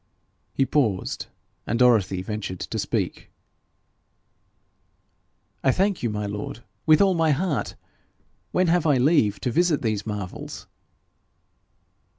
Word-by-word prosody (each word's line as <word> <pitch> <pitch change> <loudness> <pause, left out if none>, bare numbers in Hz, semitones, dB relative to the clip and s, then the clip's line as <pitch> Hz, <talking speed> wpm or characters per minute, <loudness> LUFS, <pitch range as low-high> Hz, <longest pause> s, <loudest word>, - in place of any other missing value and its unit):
He 135 - +1
paused, 115 -11 0 0.4
and 115 - 0
Dorothy 110 -7 +3
ventured 100 -3 -5
to - - -4
speak. - - -2 2.3
'I 130 - +4
thank 195 0 +1
you, 120 - 0
my 105 -1 -3
lord, 105 +3 -5 0.2
with 155 +4 +6
all 195 -1 +3
my 165 -2 +2
heart. 155 0 -1 0.8
When 185 - +2
have 170 -1 +2
I 145 -3 +4
leave 125 -7 +3
to 125 - -1
visit 165 0 +2
those 110 -2 -1
marvels?' 105 -4 -6
125 Hz, 120 wpm, -24 LUFS, 105-160 Hz, 2.3 s, with